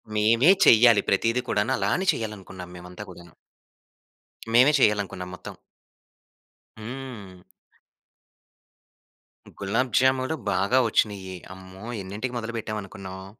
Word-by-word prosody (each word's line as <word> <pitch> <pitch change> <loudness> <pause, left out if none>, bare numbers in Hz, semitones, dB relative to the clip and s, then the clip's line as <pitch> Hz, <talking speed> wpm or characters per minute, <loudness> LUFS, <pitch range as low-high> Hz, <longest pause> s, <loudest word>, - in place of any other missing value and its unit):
మేవే 115 - +5
చెయ్యాలి 115 -2 +7
ప్రతీది 115 +5 +1
కూడాను. 105 +5 0
అలానే 190 - 0
చేయాలనుకున్నాం 95 -7 -7
మేమంతా 90 0 -10
కూడాను. 85 -2 -15 1.2
మేమే 125 +5 +6
చేయాలనుకున్నాం 100 -5 0
మొత్తం. - - -10 1.3
హ్మ్. 110 -5 -8 2.2
గులాబు 115 +6 -1
జామూలు 130 +3 +1 0.2
బాగా 100 +7 +1
వచ్చినియి. 100 -4 -1 0.2
అమ్మో! 95 +2 -12 0.2
ఎన్నింటికి 105 +7 -5
మొదలు 115 0 -5
పెట్టాం 110 -1 -4
అనుకున్నావు? 95 0 -9
105 Hz, 95 wpm, -25 LUFS, 95-120 Hz, 2.2 s, చెయ్యాలి